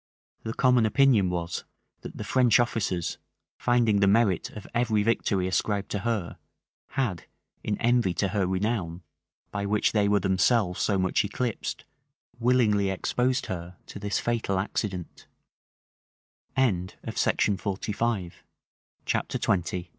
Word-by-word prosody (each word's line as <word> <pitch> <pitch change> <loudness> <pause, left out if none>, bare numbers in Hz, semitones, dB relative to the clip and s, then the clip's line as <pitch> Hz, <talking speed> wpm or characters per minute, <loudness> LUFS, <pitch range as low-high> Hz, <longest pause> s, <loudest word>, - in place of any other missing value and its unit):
[*] - - -46
The 110 0 -4
common 125 -4 +4
opinion 115 -5 +4
was, 85 -1 -3 0.4
that - - -9
the - - -4
French 125 -2 +4
officers, 100 -7 -1 0.4
finding 120 -4 +3
the 100 - +4
merit 100 -3 +3
of 105 - -10
every 115 -3 +1
victory 100 -4 +1
ascribed 100 +2 -1
to 100 - -1
her, 110 -5 -2 0.5
had, 105 - -2 0.4
in 105 - -1
envy 120 -6 +2
to 100 - 0
her 95 -2 0
renown, 95 -3 -2 0.5
by 100 -1 -2
which 105 +1 +2
they 105 -2 +2
were 100 0 +3
themselves 95 0 +2
so 100 - +2
much 95 +3 +1
eclipsed, 110 +3 -3 0.5
willingly 115 -5 +3
exposed 125 +7 0
her 90 -1 -6
to - - -9
this 100 0 -1
fatal 115 -5 -1
accident. 95 -2 -4
105 Hz, 115 wpm, -27 LUFS, 95-115 Hz, 0.5 s, common